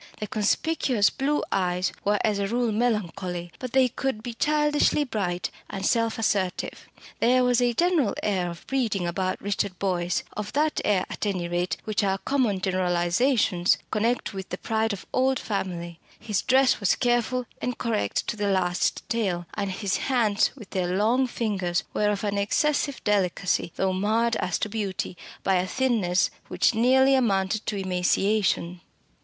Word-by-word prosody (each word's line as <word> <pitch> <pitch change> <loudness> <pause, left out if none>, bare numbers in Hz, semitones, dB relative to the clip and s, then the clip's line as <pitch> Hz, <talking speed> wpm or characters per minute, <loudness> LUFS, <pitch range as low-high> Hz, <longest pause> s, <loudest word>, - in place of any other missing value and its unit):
The 210 - -3
conspicuous 215 +2 +1
blue 285 +2 0
eyes 180 -1 0
were 205 +1 +2
as 210 -2 +1
a 200 - 0
rule 235 +1 0
melancholy; 195 -6 -2
but 255 -2 -6
they 260 -1 +5
could 250 -2 -3
be 240 -1 -5
childishly 295 +2 +2
bright 195 -9 -2 0.2
and 195 0 -4
self 230 0 +1
assertive. 195 -4 -1 0.3
There 255 +2 +4
was 250 0 +3
a 240 -1 +2
general 335 - +2
air 185 -4 0
of 170 - -10
breeding 225 -9 -1
about 185 +2 -1
Richard 200 -2 -2
Boyce, 180 -2 -1
of 210 0 -5
that 305 +2 +1
air 195 -3 +2
at - - -3
any 185 -4 -1
rate 175 +1 -1
which 215 -1 -1
our 195 -1 +1
common 235 -4 0
generalisations 180 +2 +2
connect 225 +1 0
with 190 -1 -6
the 180 - -4
pride 220 +1 0
of 200 - -6
old 260 +1 +2
family; 175 -6 -4 0.2
his 210 -4 -1
dress 265 +1 +3
was 200 -4 +2
careful 245 0 +1 0.2
and 250 -1 -2
correct 100 - -1
to - - -2
the 205 -1 -1
last 180 -2 0
detail; 190 -7 -1
and 200 -2 -2
his 195 +1 -1
hands 225 -6 +2
with 215 -8 -12
their 180 -1 -1
long 240 +6 +2
fingers 195 -7 -1
were 210 - +2
of 205 0 -2
an 205 -1 0
excessive 285 +6 0
delicacy, 195 -3 +1
though 190 -1 0
marred 220 +5 +1
as 180 -2 -1
to - - -2
beauty 200 -4 -3 0.3
by 190 -1 +3
a 180 +1 0
thinness 210 -7 +1 0.2
which - - +2
nearly 260 +4 +4
amounted 210 -5 +1
to 210 - -1
emaciation. 185 -1 0
210 Hz, 165 wpm, -26 LUFS, 185-240 Hz, 0.3 s, they